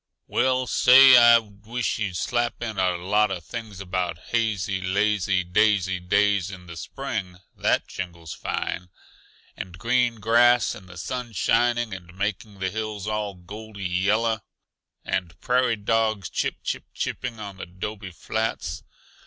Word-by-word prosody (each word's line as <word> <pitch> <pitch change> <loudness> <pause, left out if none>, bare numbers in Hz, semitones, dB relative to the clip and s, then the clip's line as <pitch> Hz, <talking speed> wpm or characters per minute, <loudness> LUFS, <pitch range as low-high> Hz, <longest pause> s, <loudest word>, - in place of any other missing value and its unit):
"Well, 130 0 +1
say, 130 +1 +8
I 120 -1 +9
wish 110 +3 -4
you'd 100 -4 -2
slap 120 +3 -1
in 110 -4 -4
a 90 -1 +2
lot 105 +4 +2
uh 95 -2 -3
things 110 +2 -8
about 90 -3 -2
hazy, 105 -5 0
lazy, 95 0 +1
daisy 95 0 +2
days 100 +1 +2
in 90 -2 -10
the 85 -1 -9
spring 95 -1 -5 0.2
that - - +1
jingles 85 -4 -7
fine! 90 +1 -4 0.7
and 90 -1 -8
green 120 +3 +1
grass 120 +2 +4
and 95 -2 -12
the 95 - -11
sun 125 +5 -5
shining 120 +2 +1
and 90 -1 -10
making 105 +1 -3
the 95 -1 -2
hills 110 -2 -4
all 105 -2 -2
goldy 100 +3 -9
yellow, 105 +5 +1 0.6
and 90 -2 -3
prairie 125 -1 +2
dogs 110 -2 0
chip - - -1
chip - - -3
chipping 120 -3 -4
on 100 -2 -7
the 95 - -7
'dobe 95 +2 -6
flats. 110 +6 -3
105 Hz, 145 wpm, -25 LUFS, 95-115 Hz, 0.7 s, I